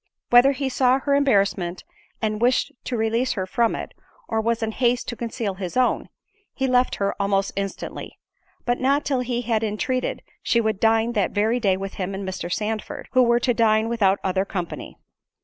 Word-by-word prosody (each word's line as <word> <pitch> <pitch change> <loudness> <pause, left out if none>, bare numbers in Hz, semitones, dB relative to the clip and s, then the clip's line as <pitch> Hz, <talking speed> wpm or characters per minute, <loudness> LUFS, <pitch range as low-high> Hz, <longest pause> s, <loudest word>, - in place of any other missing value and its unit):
Whether 245 +3 +7
he 275 0 -2
saw 255 0 +3
her 280 +1 -1
embarrassment, 200 -10 +1 0.4
and 215 0 -1
wished 250 +1 +2
to 245 - -2
release 230 +3 +1
her 190 -3 -2
from 230 +5 +1
it, - - -6 0.3
or 220 - 0
was 230 0 0
in 220 - -1
haste 245 +1 +1
to 240 - -4
conceal 230 -3 -3
his 185 +2 -5
own, 255 -1 +1 0.5
he 265 - 0
left 250 -1 +2
her 200 0 -1
almost 195 -1 +1
instantly: 195 0 -5 0.5
but 245 0 0
not 275 +3 +2
till 270 -3 +1
he 245 -1 -2
had 225 -1 0
entreated 225 +4 -2 0.2
she 235 - +2
would 220 -3 0
dine 225 +1 +3
that 205 -5 0
very 220 +4 +1
day 195 -5 +2
with 195 0 -5
him 190 +1 -3
and 195 0 -5
Mr. 180 -2 -4
Sandford, 215 +2 -3
who 255 - +4
were 235 -1 +4
to 245 - +2
dine 220 -1 +3
without 200 -4 +2
other 190 0 +1
company. 180 -4 -6
225 Hz, 190 wpm, -23 LUFS, 200-250 Hz, 0.5 s, Whether